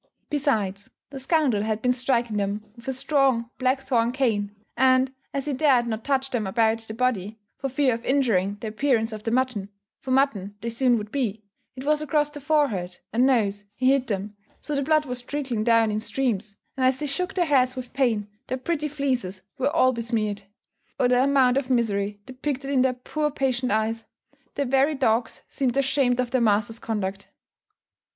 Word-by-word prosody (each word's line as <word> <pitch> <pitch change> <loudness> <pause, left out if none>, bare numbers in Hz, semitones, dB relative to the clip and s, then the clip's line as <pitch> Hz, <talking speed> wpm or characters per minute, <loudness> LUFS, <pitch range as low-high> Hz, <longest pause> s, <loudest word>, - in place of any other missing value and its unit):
Besides, 215 -9 -1 0.2
the 275 - -6
scoundrel 265 -6 +2
had 215 0 -1
been 250 - +3
striking 240 -3 0
them 205 +1 -2
with 235 0 -15
a - - +1
strong 265 -3 +1
black 260 +1 +1
thorn 240 -3 +1
cane; 215 -6 0 0.2
and, 260 +1 +3 0.2
as 275 -1 -3
he 295 - -1
dared 260 -3 +3
not 225 -1 -3
touch 270 -1 0
them 225 -5 -1
about 225 +2 +2
the 225 -1 -8
body, 220 -4 -1 0.2
for 275 - -2
fear 265 -1 +2
of 230 +1 -5
injuring 210 -8 +1
the 225 - -4
appearance 225 -1 +1
of 215 - -6
the 225 - -2
mutton, 240 -5 0 0.3
for 265 - -9
mutton 255 -7 +1
they 235 - -3
soon 245 +1 +2
would 210 -1 -6
be, 225 -6 -2 0.3
it 260 - -7
was 300 0 +2
across 295 0 +1
the 295 -1 -9
forehead 265 - 0 0.2
and 245 +3 +4
nose 205 -6 +1
he 260 +2 +3
hit 270 -2 +1
them, 205 0 -3 0.2
so 300 - -5
the 280 - +1
blood 305 +2 +2
was 250 -2 -4
trickling 255 -4 -3
down 230 -1 +4
in 210 - -1
streams, 215 -4 -2 0.2
and 265 - -2
as 255 0 +3
they 300 - -3
shook 325 +6 -2
their 355 -2 +2
heads 260 -4 +3
with 255 -1 -7
pain, 235 -6 +1 0.2
their 260 - -2
pretty 300 +3 -2
fleeces 255 -10 -2 0.2
were 270 +2 +2
all 270 -5 +3
besmeared. 225 -3 -2 0.6
Oh, 250 - +4
the 250 0 +4
amount 265 -2 +4
of 270 -2 -1
misery 205 -4 0
depicted 270 +1 -4
in 265 -2 +3
their 260 0 +3
poor 300 +4 -2
patient 260 -3 -1
eyes! 220 +1 -1 0.5
The 280 - 0
very 270 +4 +2
dogs 235 -3 0
seemed 260 -2 -1
ashamed 270 -2 +2
of 250 -1 0
their 260 -2 +2
master's 220 +1 +1
conduct. 195 -4 -3
250 Hz, 190 wpm, -25 LUFS, 220-270 Hz, 0.6 s, and